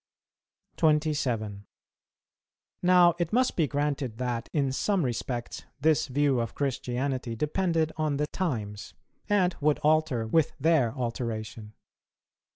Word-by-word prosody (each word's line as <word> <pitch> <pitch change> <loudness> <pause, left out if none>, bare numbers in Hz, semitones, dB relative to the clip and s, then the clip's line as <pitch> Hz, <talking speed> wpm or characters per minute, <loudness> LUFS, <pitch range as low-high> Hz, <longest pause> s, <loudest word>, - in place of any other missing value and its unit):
27. 130 - 0 1.1
Now 180 -1 +6
it 170 -2 -1
must 255 +2 +2
be 160 -4 +2
granted 140 -5 -2
that, 120 -2 -3
in 140 -3 0
some 185 +4 0
respects, 120 0 -4 0.2
this 155 0 +2
view 140 -1 +1
of 115 -1 -3
Christianity 130 -2 -2
depended 160 - 0
on 155 -2 0
the 150 - +1
times, 110 - -4 0.3
and 185 -3 +2
would 150 0 +3
alter 155 -6 +2
with 155 +7 +2
their 145 -6 +3
alteration. 115 -3 -4
140 Hz, 115 wpm, -28 LUFS, 120-160 Hz, 1.1 s, Now